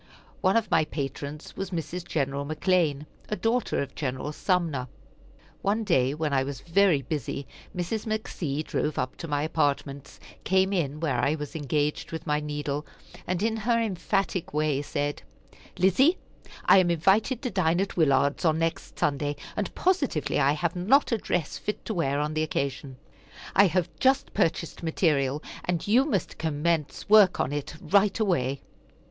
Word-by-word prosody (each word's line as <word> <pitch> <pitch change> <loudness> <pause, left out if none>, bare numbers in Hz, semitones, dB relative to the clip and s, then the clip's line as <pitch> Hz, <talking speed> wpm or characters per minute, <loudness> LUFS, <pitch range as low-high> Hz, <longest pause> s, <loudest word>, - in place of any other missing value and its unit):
One 190 +3 +3
of 225 -2 -1
my - - +4
patrons 145 0 -5
was 195 - -4
Mrs. 175 0 -4
Gen. 140 -3 0
McClean, 150 +1 0 0.2
a 210 - 0
daughter 230 -6 0
of 140 - -9
Gen. 130 -4 -3 0.2
Sumner. 165 -8 0 0.7
One 210 +3 +1
day 135 -9 +2
when 155 -2 -1
I 135 -1 +3
was 135 -1 -6
very 170 -4 +3
busy, 140 0 -4 0.3
Mrs. 205 +6 -2
McC. 160 -9 -2
drove 150 - -2
up 130 - -2
to 165 - -6
my 145 -1 0
apartments, 140 -3 -1 0.2
came 190 +1 +2
in 155 -4 -1
where 140 -7 0
I 140 +5 +2
was 150 +1 -7
engaged 150 0 -1
with 160 0 -5
my 150 0 +1
needle, 150 -1 -3 0.4
and 185 +2 -1
in 225 0 +1
her 230 +2 +1
emphatic 195 -4 -1
way 150 -2 +1
said: 145 0 -3 0.6
"Lizzie, 255 - +4 0.5
I 195 - +7
am 180 -2 +3
invited 195 - +2
to 250 - -2
dine 175 -3 +2
at 195 - -1
Willard's 140 -3 +2
on 160 -2 +3
next 165 0 -2
Sunday, 145 0 0 0.2
and 205 -3 -2
positively 310 - +1
I 140 +1 +4
have 170 +3 -1
not 235 +13 +3
a 230 - +2
dress 175 -5 -2
fit 210 - -4
to 220 - -2
wear 145 -6 0
on 150 +1 -1
the 155 - 0
occasion. 140 -3 -3 0.6
I 200 +2 +7
have 180 -1 +1
just 265 +1 +2
purchased 170 -4 0
material, 150 -4 +1 0.2
and 175 0 -1
you 245 +6 +5
must 205 - -2
commence 160 0 -1
work 205 -3 +6
on 135 - 0
it 145 +1 -4
right 200 +3 +2
away." 140 - 0
160 Hz, 165 wpm, -27 LUFS, 145-195 Hz, 0.7 s, I